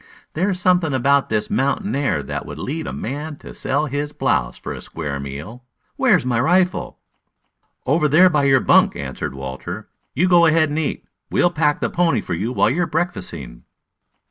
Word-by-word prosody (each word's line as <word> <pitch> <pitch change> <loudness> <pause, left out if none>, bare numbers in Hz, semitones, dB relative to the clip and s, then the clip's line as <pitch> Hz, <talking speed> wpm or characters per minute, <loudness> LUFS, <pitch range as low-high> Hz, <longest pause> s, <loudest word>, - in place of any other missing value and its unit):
"There's 185 +3 0
something 175 -5 +2
about 140 +2 +2
this 110 -1 -1
mountain 135 -4 0
air 130 - 0
that 70 +2 -4
would - - -7
lead 155 +3 -4
a - - -3
man 150 +5 -5
to - - -12
sell 140 +3 -1
his 145 +1 -3
blouse - - 0
for - - -6
a - - -8
square 75 -4 -5
meal. 75 - -8 0.3
Where's - - +3
my 120 -2 +1
rifle?" 180 +6 +1 0.9
"Over 150 +3 +2
there 160 +6 +6
by 150 -5 +2
your 135 -2 +4
bunk," - - +4
answered - - -5
Walter. 70 +10 -7 0.3
"You 180 - +3
go 175 -2 +6
ahead 155 -1 +3
and 150 +2 -1
eat. 155 - -3 0.2
We'll 175 - +2
pack 150 -3 +1
the - - 0
pony 175 -1 +2
for - - -5
you 100 +8 -2
while 130 - +2
you 165 +7 0
are 175 - 0
breakfasting." 90 - -4
140 Hz, 185 wpm, -20 LUFS, 110-160 Hz, 0.9 s, there